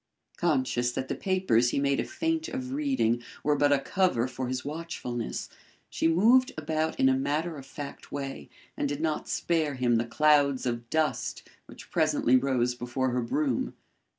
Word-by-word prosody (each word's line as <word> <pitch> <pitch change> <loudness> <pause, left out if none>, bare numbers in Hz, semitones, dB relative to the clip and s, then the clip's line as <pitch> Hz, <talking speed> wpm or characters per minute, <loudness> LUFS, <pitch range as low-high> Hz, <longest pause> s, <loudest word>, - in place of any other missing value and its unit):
Conscious 130 -7 +1
that 130 - -4
the - - 0
papers 185 -12 +2
he - - -2
made 140 0 +1
a - - +1
feint 325 +1 -2
of 260 -5 -5
reading 265 - +1 0.2
were 150 0 +3
but 145 0 +3
a 145 - +5
cover 140 - +1
for 130 0 -4
his 130 +1 -3
watchfulness, 145 -6 -4 0.4
she - - +1
moved 230 +10 +5
about 155 +1 -1
in 130 - +5
a 130 - +5
matter 150 +5 -1
of 135 -2 -10
fact 145 -1 -8
way 135 - -5 0.3
and 145 - -1
did 145 0 -3
not 155 -1 -1
spare 160 -4 0
him 120 -2 +2
the 115 - +1
clouds 140 +1 +3
of 120 -1 -3
dust 160 +1 -1 0.2
which - - -13
presently 125 - +3
rose 125 -2 +2
before 125 +1 -2
her 125 0 0
broom. 130 +1 -1
140 Hz, 175 wpm, -28 LUFS, 125-160 Hz, 0.4 s, a